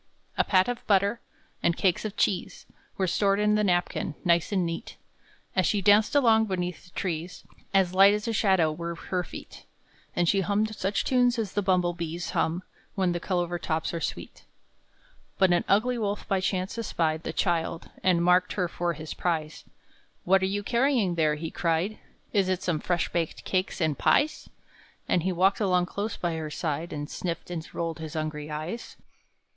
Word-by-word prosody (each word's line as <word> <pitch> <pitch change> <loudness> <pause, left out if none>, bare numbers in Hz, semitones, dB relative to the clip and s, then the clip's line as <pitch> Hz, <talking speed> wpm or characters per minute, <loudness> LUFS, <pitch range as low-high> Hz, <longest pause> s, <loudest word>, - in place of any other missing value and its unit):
A - - +3
pat 185 -1 +3
of 245 -1 -3
butter, 200 +3 +2 0.4
and 170 0 +1
cakes 185 +2 +1
of 210 - -5
cheese, 185 -4 -1 0.3
Were 190 - +1
stored 195 +2 +2
in 210 0 +3
the 210 0 +2
napkin, 175 -5 0
nice 170 +1 +3
and 190 -3 +1
neat; 165 0 -5 0.6
As 185 - +3
she 210 - +1
danced 210 +5 +4
along 225 -5 +5
beneath 180 -4 -3
the - - -17
trees, 175 -1 -4 0.3
As 190 -2 +3
light 195 +2 +7
as 210 +2 -4
a 230 - 0
shadow 190 -7 +3
were 170 +2 -5
her 180 +2 -3
feet; - - -10 0.5
And 175 -1 +2
she 195 +3 +3
hummed 210 +4 0
such 195 +1 -1
tunes 245 -1 +3
as 215 -4 -2
the 205 - +1
bumble 180 -2 +2
bees 170 0 -4
Hum 170 +3 0 0.3
when 190 -3 +1
the 175 - -2
clover 175 -1 -1
tops 160 -1 -2
are 165 - -3
sweet. - - -5 0.9
But 190 -2 +4
an 175 - +2
ugly 240 +5 +2
wolf 205 -1 -2
by 195 -3 +1
chance 185 +3 -2
espied 160 -7 -1
The - - -4
child, 170 -2 -1
and 180 -2 +3
marked 180 +1 +3
her 180 -3 0
for 170 0 -2
his 155 0 -7
prize. 155 -3 -2 0.6
"What 190 +2 +4
are 190 - +1
you 205 +1 -2
carrying 235 -4 +2
there?" 155 -3 +2
he 160 +2 -5
cried; 170 +5 -1 0.3
"Is 195 -3 +2
it 185 -1 -1
some 170 -4 0
fresh 175 +1 0
baked 170 -2 -2
cakes 185 +1 -1
and 155 -4 +1
pies?" 300 - +2 0.6
And 180 - +2
he 185 +3 0
walked 190 +3 +2
along 180 -4 +2
close 200 +4 -4
by 170 -2 -2
her 155 -1 -4
side, 160 +2 -3
And 145 -1 -4
sniffed 170 +1 -5
and 165 -2 -5
rolled 165 -1 -3
his 160 -1 -7
hungry 155 -1 -3
eyes. 155 +10 -5
180 Hz, 185 wpm, -27 LUFS, 170-200 Hz, 0.9 s, light